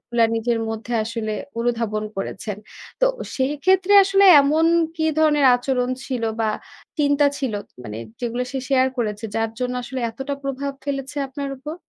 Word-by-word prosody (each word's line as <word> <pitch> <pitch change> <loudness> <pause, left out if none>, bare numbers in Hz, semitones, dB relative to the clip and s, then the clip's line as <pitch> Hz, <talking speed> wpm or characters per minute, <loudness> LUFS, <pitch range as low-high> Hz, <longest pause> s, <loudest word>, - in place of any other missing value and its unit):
গুলা 235 -1 +3
নিজের 230 +1 0
মধ্যে 225 +2 -5
আসলে 220 -1 -3 0.3
অনুধাবন 230 -3 -1
করেছেন। 195 +1 -4 0.4
তো - - +5 0.3
সেক্ষেত্রে 355 +9 +2
আসলে 390 +1 +4 0.2
এমন 305 +4 +3 0.3
কি 320 - -1
ধরনের 300 -3 +4
আচরণ 250 0 0 0.2
ছিল 255 -3 -3 0.2
বা 220 - +2 0.5
চিন্তা 285 0 +3
ছিল? 265 -5 -2 0.3
মানে 105 0 -6 0.2
যেগুলো 240 +1 -2
সে 270 - -2
শেয়ার 260 -2 +4
করেছে। 215 -2 -2
যার 225 0 0
জন্য 250 0 -2
আসলে 255 +2 -5
এতটা 270 +5 -4
প্রভাব 275 +1 -3
ফেলেছে 280 0 -4
আপনার 280 +1 -5
উপর? 300 +4 -6
260 Hz, 150 wpm, -22 LUFS, 230-285 Hz, 0.5 s, তো